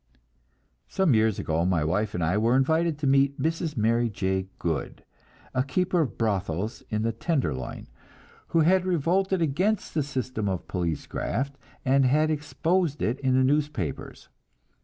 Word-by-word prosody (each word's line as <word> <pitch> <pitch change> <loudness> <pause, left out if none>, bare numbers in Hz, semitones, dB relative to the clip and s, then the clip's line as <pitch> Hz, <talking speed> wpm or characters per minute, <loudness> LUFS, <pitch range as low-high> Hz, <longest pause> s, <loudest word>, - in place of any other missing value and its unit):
Some 190 -7 +2
years 110 -2 +3
ago 80 +1 0
my 90 -3 +1
wife 105 +7 -1
and 90 - -1
I 85 +4 +1
were 115 +4 +3
invited 160 +4 +2
to 150 - -3
meet 140 +1 +3
Mrs. 160 0 -1
Mary 115 +2 +2
J. 95 -2 -2
Goode, 80 -3 -3 0.5
a 130 - +2
keeper 175 +6 +1
of 145 - -3
brothels 100 -1 -1
in 110 -1 -1
the 115 - +1
"Tenderloin," 110 - -2 0.6
who 165 - +2
had 180 +3 +4
revolted 185 +1 +1
against 185 +8 0
the 155 - +1
system 130 -6 -3
of 95 -2 -4
police 85 -5 -2
graft, 140 +3 -3 0.3
and 135 +1 +4
had 155 +4 +3
exposed 155 +1 0
it 120 +4 0
in 130 -2 +1
the 130 - +4
newspapers. 140 - -2
130 Hz, 155 wpm, -26 LUFS, 105-155 Hz, 0.6 s, had